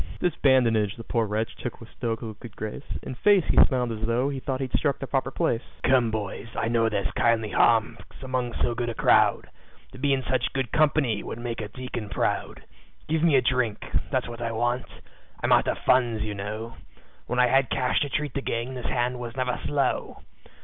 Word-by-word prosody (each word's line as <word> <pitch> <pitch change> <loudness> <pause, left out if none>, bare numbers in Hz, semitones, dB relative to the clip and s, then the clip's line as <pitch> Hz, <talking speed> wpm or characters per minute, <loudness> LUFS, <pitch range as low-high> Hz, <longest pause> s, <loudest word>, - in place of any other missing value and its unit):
This 175 - +1
badinage 115 -7 +3
the 115 - -9
poor 115 -2 0
wretch 110 +2 -2
took - - -6
with - - -12
stoical 115 -1 -3
good 110 +1 -12
grace; 110 +6 -6
In - - -5
face, 195 +7 +4
he - - +8
smiled 125 -4 -1
as 110 -1 -5
tho' 120 +4 +1
he 140 -2 -3
thought 130 0 -3
he'd 130 -2 -3
struck 140 -3 +1
the 135 - -5
proper 135 0 -1
place. 115 -3 0 0.2
"Come, 125 -3 +4
boys, 110 0 -4
I 115 - 0
know 115 -1 +2
there's 100 -2 -1
kindly 115 -2 +2
hearts 115 0 +3 0.2
among 130 -2 -2
so 120 - +1
good 120 0 -2
a 115 - -4
crowd - - +3 0.4
To - - -12
be 140 +1 +1
in 135 -1 +1
such 125 -1 -1
good 135 -4 -2
company 140 -8 +2
would - - -6
make 120 -1 -4
a 105 - -4
deacon 120 -3 -6
proud. - - -2 0.4
"Give 160 0 0
me 165 -3 +4
a 130 - +5
drink 120 -4 0 0.2
that's - - 0
what 120 0 -8
I 115 -1 -1
want 120 +2 0 0.6
I'm - - +1
out - - +5
of - - 0
funds, 120 -4 +3
you 105 -1 -3
know, 110 +3 -6 0.5
When 125 - -2
I 125 - +6
had 135 +1 +3
cash 125 -1 +1
to 145 - -1
treat 150 -1 -2
the 140 - -2
gang 120 +1 -3
this 125 -2 -5
hand 125 0 -1
was 120 0 -6
never 125 -1 -1
slow. 145 -1 -1
120 Hz, 210 wpm, -26 LUFS, 115-130 Hz, 0.6 s, he